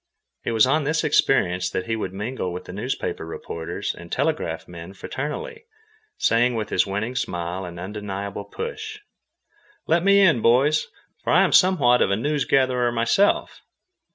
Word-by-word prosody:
It - - -2
was 110 0 +5
on 150 +4 +2
this 150 +3 0
experience 90 -11 +2
that 90 - -3
he 115 - -1
would 110 - -4
mingle 105 -1 -4
with 90 - -7
the - - -9
newspaper 115 0 -3
reporters 80 0 -5
and 85 0 -12
telegraph 140 - -1
men 85 +2 -10
fraternally, 435 - -6 0.5
saying 120 +1 +2
with 110 -1 -3
his 90 - +2
winning 105 +6 -3
smile 90 -2 -3
and 85 -1 -8
undeniable 100 +1 -5
"push": 440 - -6 0.9
"Let 165 +1 +2
me 200 +1 +5
in, 165 - +4
boys, 140 +7 +3 0.4
for - - -1
I - - +6
am - - +1
somewhat 145 -10 +5
of - - +3
a 100 - +2
news 145 +6 -1
gatherer 125 -3 +2
myself." 120 - +1
115 Hz, 160 wpm, -23 LUFS, 95-150 Hz, 0.9 s, I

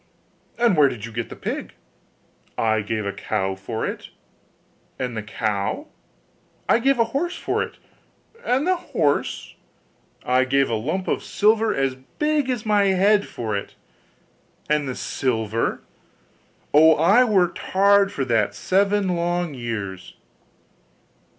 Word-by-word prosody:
'And 235 -5 +3
where 145 -3 +5
did 110 -4 -6
you 115 - -9
get 115 +1 -4
the - - -8
pig?' - - -5 0.8
'I 110 -1 +1
gave 110 0 -3
a 100 - -1
cow 95 0 -2
for 95 +4 -4
it.' - - -6 0.9
'And 125 -2 -3
the 110 - -3
cow?' 105 -1 -3 0.8
'I - - +4
gave 270 +2 +2
a 230 - +4
horse 345 +6 -1
for - - -1
it.' - - -5 0.7
'And 260 +4 +1
the 370 0 +2
horse?' 165 - -1 0.7
'I 130 +1 +3
gave 135 -1 +1
a - - 0
lump 155 - -2
of - - 0
silver 220 +1 +2
as 135 -1 0 0.2
big 300 -3 +1
as 245 -4 -2
my 205 -2 +3
head 200 +2 +3
for 110 -3 -4
it.' 100 - -5 0.9
'And 150 -2 0
the 130 - -4
silver?' 115 -3 -2 0.9
'Oh! 160 +2 +7
I 200 +10 +5
worked 190 -7 +2
hard 200 +1 +3
for 140 -9 -2
that 105 -4 +1
seven 195 - +1
long 175 -1 -1
years. 105 -7 -6
150 Hz, 140 wpm, -23 LUFS, -, 0.9 s, Oh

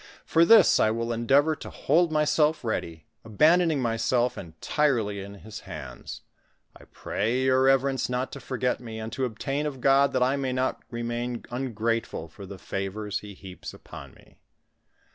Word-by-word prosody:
For 165 +1 +4
this 220 -2 +7
I - - +4
will 115 +1 -2
endeavor 140 +7 +3
to - - -9
hold 170 0 +1
myself 150 0 +2
ready, 85 -8 -4 0.2
abandoning 155 - +3
myself 120 +2 +1
en 80 -3 -9
tirely 120 -9 0
in 100 +1 -8
his 110 +2 -10
hands. 70 -5 -9 0.5
I - - -15
pray 120 +5 -2
your 130 0 +3
reverence 135 0 +2
not 125 +1 -2
to 140 - -7
forget 125 -1 -2
me, 115 -2 -8
and 110 0 -6
to 130 +2 -1
obtain 135 +5 -3
of 135 -3 -6
God, 140 +1 +4
that 130 -1 +2
I 130 +2 +1
may 135 -2 -2
not 130 +1 -1
remain 120 0 -4
ungrateful 115 -8 -2
for 100 +3 -11
the 100 - -9
favors 100 +2 -4
he 105 -1 -11
heaps 95 -1 -10
upon 70 -2 -12
me." - - -22
120 Hz, 165 wpm, -26 LUFS, 110-135 Hz, 0.5 s, this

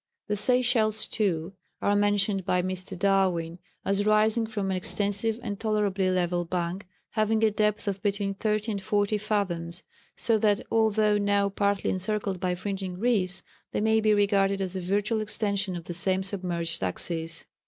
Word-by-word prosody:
The 210 - -1
Seychelles, 225 -1 +3
too, 185 -4 -1 0.3
are 205 - +2
mentioned 205 -1 +2
by 180 -1 +1
Mr. 185 +1 -4
Darwin 180 -3 +1 0.3
as 200 +1 +1
rising 215 +2 +3
from 205 -3 -2
an - - 0
extensive 205 +4 0
and 205 -4 -4
tolerably 205 -3 +1
level 175 -1 +1
bank 175 +2 -3 0.2
having 220 0 +1
a 220 - +4
depth 210 0 0
of 195 -1 -2
between 200 -1 -1
30 215 +2 -1
and 200 -2 -3
40 205 +1 +1
fathoms; 185 -5 -2 0.3
so 225 -2 +1
that, 205 -1 +2
although 215 -2 +3
now 200 0 +2
partly 200 0 0
encircled 195 0 -2
by 180 -1 0
fringing 190 -1 -4
reefs, 195 -4 +1 0.3
they - - 0
may 220 +1 +3
be 215 0 +3
regarded 200 -1 +2
as 190 -1 -3
a - - -1
virtual 205 +4 0
extension 205 -3 -1
of 170 - -6
the 175 - -6
same 185 +2 +1
submerged 180 -4 -2
axis. 165 - -4
200 Hz, 165 wpm, -27 LUFS, 185-215 Hz, 0.3 s, a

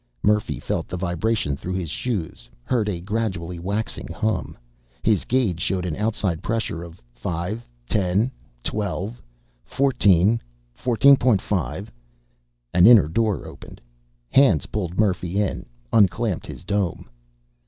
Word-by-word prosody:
Murphy 105 0 +2
felt - - -2
the 90 - -4
vibration 90 -2 0
through 90 +6 -5
his 90 -5 -3
shoes, 85 - -4
heard 110 - 0
a 90 -4 -3
gradually 95 -4 -3
waxing 100 +5 -3
hum. 110 0 -2 0.5
His 105 -3 +2
gauge 115 -10 +1
showed 90 -1 0
an 85 -4 -2
outside 105 -5 -1
pressure 110 -7 -2
of 85 0 -10
5, 90 +7 -4 0.2
10, 100 - +1 0.3
12, 105 +2 -3 0.4
14, 115 -6 +3 0.3
14.5. 115 - +3 0.9
An 90 +3 +7
inner 115 -8 +8
door 105 +4 0
opened. - - -11 0.5
Hands 105 - +5
pulled 90 -4 -4
Murphy 95 -2 +1
in, 105 -2 -2 0.3
unclamped 105 -1 +2
his - - -9
dome. 100 -2 -1
100 Hz, 120 wpm, -23 LUFS, 90-110 Hz, 0.9 s, inner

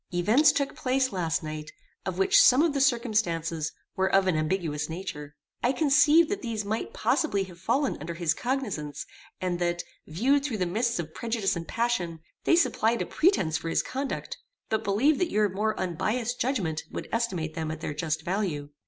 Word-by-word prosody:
Events 215 - +4
took 280 -1 -1
place 260 0 0
last 165 -5 -1
night 155 0 -6 0.4
of 185 -1 -3
which 195 - +5
some 260 +4 +6
of 330 -3 +2
the 280 - 0
circumstances 210 - +1 0.2
were 190 0 +1
of 195 0 +4
an 185 -3 +2
ambiguous 155 -2 -1
nature. 160 -4 -6 0.3
I 250 - +2
conceived 300 +3 +5
that 405 - -2
these 225 -4 -3
might 220 - -2
possibly 315 - +1
have 180 -2 -12
fallen 265 +9 0
under 165 +3 -6
his 165 -2 +1
cognizance, 205 - -3 0.3
and 180 -1 -2
that, 175 0 0 0.2
viewed 260 - +2
through 260 -7 -2
the 185 - 0
mists 230 +7 0
of 160 -2 -5
prejudice 225 -5 -1
and 165 -1 -5
passion, 205 -9 -1 0.3
they - - +5
supplied 235 -9 +2
a - - -6
pretence 190 - +2
for 165 - -4
his - - +1
conduct, 270 +1 -4 0.3
but 220 - 0
believed 255 +10 +2
that 360 - +1
your 210 -1 +2
more 210 +3 -1
unbiassed 220 +7 -1
judgment 190 - 0
would - - -5
estimate 185 -9 -1
them 160 -1 -3
at 155 0 -5
their 150 - -3
just 155 +1 -2
value. 175 -7 -2
195 Hz, 185 wpm, -27 LUFS, 165-250 Hz, 0.4 s, some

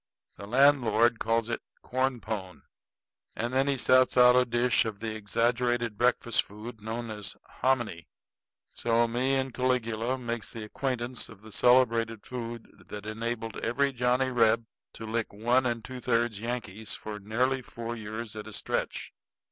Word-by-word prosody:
The 100 - -9
landlord 120 -3 +4
calls 115 0 +1
it 120 - -3 0.2
corn 130 -1 0
pone; 100 -4 -5 0.7
and 120 +2 -2
then 135 +1 +3
he 140 -1 +1
sets 130 +1 +4
out 125 0 +8
a 125 0 +5
dish 120 0 +2
of 110 -3 -5
the 110 0 -3
exaggerated 115 +2 0
breakfast 120 0 +2
food 110 +2 -10
known 115 +1 -4
as 105 -2 -6 0.3
hominy; 125 -8 +1
and 85 - -14 0.7
so 115 0 +2
me 125 +4 +1
and 130 -1 -1
Caligula 125 -1 0
makes 120 -3 -4
the 115 - -6
acquaintance 125 +2 -3
of 105 -2 -14
the 110 - -12
celebrated 115 -2 +3
food 120 -2 -7
that 105 0 -7
enabled 115 0 -3
every 135 +4 0
Johnny 125 +1 +1
Reb 115 -1 +3 0.3
to 110 - -8
lick 115 0 -2
one 120 +5 +2
and 115 -2 -2
two 130 0 -7
thirds 120 -3 0
Yankees 110 -3 -3
for 105 -1 -7
nearly 125 +6 0
four 115 -1 -6
years 110 0 -6
at 105 0 -7
a 110 - -8
stretch. - - -3
115 Hz, 160 wpm, -29 LUFS, 110-125 Hz, 0.7 s, out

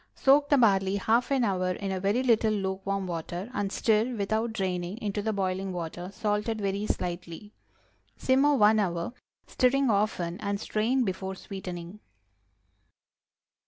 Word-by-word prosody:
Soak 285 +2 +4
the 285 - +5
barley 195 -5 +3
half 225 +5 +1
an 270 -3 +2
hour 185 -3 0
in 195 +1 -4
a 190 - -2
very 205 +7 +1
little 225 -3 +3
lukewarm 195 -1 -2
water, 175 +4 -5
and 200 -4 -2
stir, 225 +3 +1
without 220 +2 -1
draining, 185 -2 -2
into 210 -3 -3
the 220 +1 -1
boiling 190 -1 -2
water, 175 0 -5
salted 210 +2 -1
very 200 +1 -2
slightly. 175 +3 -4 0.6
Simmer 275 +3 +3
one 215 -3 +5
hour, 175 +1 -1 0.3
stirring 260 0 +2
often, 200 -4 0
and 200 -1 -2
strain 230 +5 0
before 190 -2 -3
sweetening. 185 -1 -7
200 Hz, 140 wpm, -28 LUFS, 185-225 Hz, 0.6 s, the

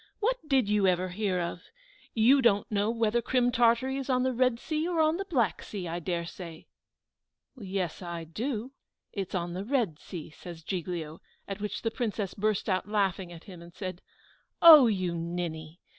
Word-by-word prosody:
What - - +1
did 265 -6 +3
you 205 -2 +3
ever 185 0 +1
hear 185 -1 -1
of? 170 -1 -3 0.5
You 250 +5 +5
don't 205 -4 +2
know 205 +1 +1
whether 230 0 +1
Crim 245 0 +2
Tartary 240 +2 +3
is 275 0 -5
on 255 -1 +2
the 260 0 +1
Red 250 -1 +2
Sea, 310 +3 -2
or 350 -2 -1
on 315 +1 +3
the 390 - -4
Black 245 - 0
Sea, 190 -4 -6
I 170 +1 -3
dare 170 0 -2
say." 170 -2 -9 0.9
"Yes, 190 - -3
I 170 -2 -5
do; 225 - -4 0.4
it's 195 -2 -4
on 175 -1 -2
the 185 +2 -4
Red 220 - 0
Sea," 165 -4 -8
says 165 +1 -10
Giglio; 170 -3 -4 0.3
at 200 +1 -5
which 210 - -4
the 225 - 0
Princess 215 -5 -2
burst 215 -1 0
out 190 0 0
laughing 195 -4 0
at 170 -1 -11
him, 180 -3 -11
and 170 0 -14
said, 185 -3 -6 0.6
"Oh, 310 -6 +10
you 185 -5 0
ninny! 165 -1 -5
200 Hz, 185 wpm, -29 LUFS, 175-240 Hz, 0.9 s, Oh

